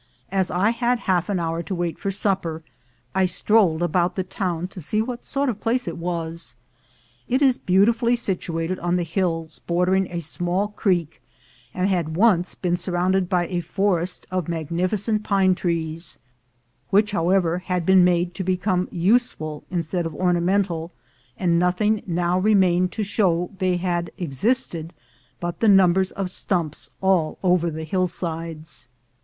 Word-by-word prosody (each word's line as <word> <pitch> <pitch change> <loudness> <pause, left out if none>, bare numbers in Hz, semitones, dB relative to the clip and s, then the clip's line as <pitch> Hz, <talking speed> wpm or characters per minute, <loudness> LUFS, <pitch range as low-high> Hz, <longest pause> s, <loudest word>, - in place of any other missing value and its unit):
As 190 -2 +1
I 195 +5 +2
had 240 +1 +1
half 180 0 0
an 195 -3 0
hour 165 0 -2
to 190 +3 -4
wait 175 -1 -3
for 195 - -2
supper, 190 -5 -1 0.5
I 190 0 +3
strolled 185 -3 +2
about 175 +1 +1
the 190 - -1
town 180 -2 -3
to 185 - -9
see 210 +8 -1
what 240 +2 -3
sort 280 +1 -1
of 235 -6 -1
a - - -26
place 245 +2 0
it - - -4
was. 170 -4 -4 0.7
It 260 +3 +2
is 260 -3 +4
beautifully 230 +6 +3
situated 185 -5 -3
on 175 +1 0
the 180 - +1
hills 165 -2 -2
bordering 180 +2 +2
a 175 - -4
small 175 +5 -1
creek, 180 - -1 0.5
and 185 +1 0
had 170 -5 -1
once 185 -3 +3
been 175 -1 -1
surrounded 180 +1 0
by 180 -2 +2
a 175 0 -2
forest 180 0 -1
of 185 -4 -1
magnificent 180 +6 -1
pine 195 -3 +3
trees, 165 -2 -3 0.7
which, 210 +2 +3
however, 180 -2 +2
had 180 -2 -2
been 190 0 +6
made 175 0 +2
to 190 - -4
become 185 0 0
useful 175 -6 0
instead 175 -1 -2
of 165 - -8
ornamental, 180 -1 +1 0.5
and 170 -2 +2
nothing 200 +5 +1
now 175 +1 +1
remained 185 -3 +3
to 220 - -2
show 180 -4 +1
that 195 - -20
they 185 -2 +1
had 175 -1 -1
existed 170 - -1 0.5
but 175 0 -4
the 225 - +4
numbers 190 -1 +5
of 195 -2 -3
stumps 170 -6 -2
all 185 -5 +2
over 180 -2 +3
the 160 0 -5
hillsides. 165 -5 -3
180 Hz, 160 wpm, -23 LUFS, 170-195 Hz, 0.7 s, been